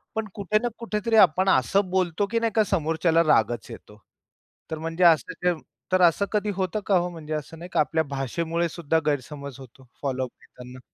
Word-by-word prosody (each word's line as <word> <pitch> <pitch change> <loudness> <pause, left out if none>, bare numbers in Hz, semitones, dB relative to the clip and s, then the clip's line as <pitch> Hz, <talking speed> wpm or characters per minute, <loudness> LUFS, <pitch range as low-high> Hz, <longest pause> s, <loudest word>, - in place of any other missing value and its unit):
पण 220 0 -2
कुठे 210 +1 0
ना 240 - +1
कुठेतरी 225 -1 -1
आपण 185 +3 0
असं 195 0 +2
बोलतो, 185 +1 0
की 230 - +2
नाही 230 -1 0
का, 220 - +5
समोरच्याला 165 -2 +1
रागच 120 -4 +2
येतो. 105 -2 -13 0.7
तर 160 - -2
म्हणजे 165 +2 -2
असं 170 +1 +3 0.3
तर 185 0 +3
असं 175 +3 +4
कधी 210 -1 0
होतं 190 +2 -1
का 200 - +2
हो, 175 0 0
म्हणजे 160 -3 -7
असं 155 +1 -5
नाही 175 +2 -9
का - - +2
आपल्या 160 +1 +2
भाषेमुळे 160 +5 -2
सुद्धा 160 -1 0
गैरसमज 140 -1 -3
होतो 130 0 -15
फॉलोअप 130 -2 -2
घेताना? 125 0 -13
165 Hz, 180 wpm, -25 LUFS, 145-190 Hz, 0.7 s, का